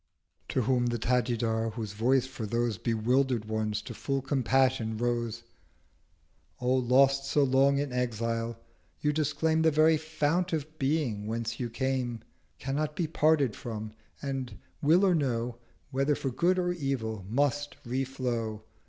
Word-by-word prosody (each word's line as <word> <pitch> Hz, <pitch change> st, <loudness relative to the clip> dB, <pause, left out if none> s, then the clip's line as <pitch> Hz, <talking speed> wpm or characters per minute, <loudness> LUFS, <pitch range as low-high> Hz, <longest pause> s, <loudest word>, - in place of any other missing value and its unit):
'— -, -, -43 dB
To 130 Hz, -, +1 dB
whom 120 Hz, +1 st, +2 dB
the 120 Hz, 0 st, 0 dB
Tajidar, 115 Hz, -2 st, 0 dB
whose 110 Hz, -4 st, -5 dB
Voice 125 Hz, +4 st, +2 dB
for 130 Hz, -4 st, -6 dB
those 115 Hz, -1 st, 0 dB
560 115 Hz, +5 st, -1 dB
Bewilder'd 125 Hz, +1 st, +1 dB
ones 110 Hz, -1 st, -2 dB
to -, -, -7 dB
full 135 Hz, -1 st, -2 dB
Compassion 130 Hz, -4 st, +1 dB
rose 120 Hz, -1 st, -1 dB, 1.2 s
'O 125 Hz, +1 st, +1 dB
lost 135 Hz, +2 st, +4 dB
so 145 Hz, -, +2 dB
long 135 Hz, +1 st, +4 dB
in 140 Hz, -2 st, -2 dB
exile, 115 Hz, -1 st, -1 dB, 0.4 s
you 150 Hz, 0 st, +2 dB
disclaim 155 Hz, +1 st, +1 dB
The 160 Hz, -, +5 dB
very 155 Hz, +1 st, +4 dB
Fount 160 Hz, +3 st, 0 dB
of 155 Hz, 0 st, -4 dB
Being 135 Hz, -8 st, 0 dB
whence 115 Hz, +1 st, -3 dB
you 120 Hz, -2 st, -2 dB
came, 125 Hz, -2 st, -2 dB, 0.4 s
Cannot 150 Hz, +3 st, -2 dB
be 175 Hz, -, 0 dB
parted 155 Hz, -6 st, +2 dB
from, 110 Hz, -2 st, -6 dB, 0.3 s
and, 130 Hz, -5 st, -4 dB, 0.2 s
will 170 Hz, +7 st, +5 dB
or 185 Hz, -, +4 dB
no, 120 Hz, -6 st, -1 dB, 0.3 s
Whether 135 Hz, +2 st, +2 dB
for 135 Hz, -, -3 dB
Good 175 Hz, +8 st, +2 dB
or 175 Hz, -1 st, +1 dB
Evil 130 Hz, -, -2 dB
must 145 Hz, +4 st, 0 dB
re 130 Hz, +3 st, -1 dB
flow! 120 Hz, -5 st, -3 dB
130 Hz, 155 wpm, -29 LUFS, 115-145 Hz, 1.2 s, The